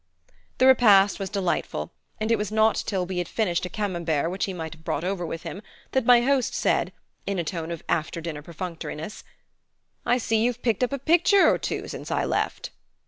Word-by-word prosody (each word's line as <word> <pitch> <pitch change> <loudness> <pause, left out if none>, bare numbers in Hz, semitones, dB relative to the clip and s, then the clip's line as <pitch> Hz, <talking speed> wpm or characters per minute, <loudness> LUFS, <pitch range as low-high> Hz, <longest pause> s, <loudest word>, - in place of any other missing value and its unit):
The 255 - +4
repast 210 -7 +6
was 195 -1 -3
delightful, 195 -4 -2 0.3
and 220 +1 -1
it - - +5
was 210 0 -3
not 220 0 +3
till 190 -3 0
we 180 0 -3
had 175 - -2
finished 180 -5 -1
a - - -10
Camembert 170 -7 -1
which 190 - -1
he 195 - -4
must 160 -3 -5
have 160 0 -17
brought 155 - -2
over 185 -1 -2
with 165 +1 -5
him, 195 - -6 0.3
that 260 -3 0
my 245 -1 +7
host 270 0 +1
said, - - +1 0.4
in 200 -1 -1
a 175 - 0
tone 165 -1 -4
of 170 -2 -6
after 165 +1 -1
dinner 160 -3 -5
perfunctoriness: 170 +2 -6 0.8
"I 245 - +2
see 225 -2 +1
you've 245 0 -1
picked 230 0 +1
up 250 - +1
a 280 - -1
picture 345 +7 +4
or - - +3
two - - -3
since - - -7
I - - 0
left." - - -2
195 Hz, 205 wpm, -25 LUFS, 170-230 Hz, 0.8 s, my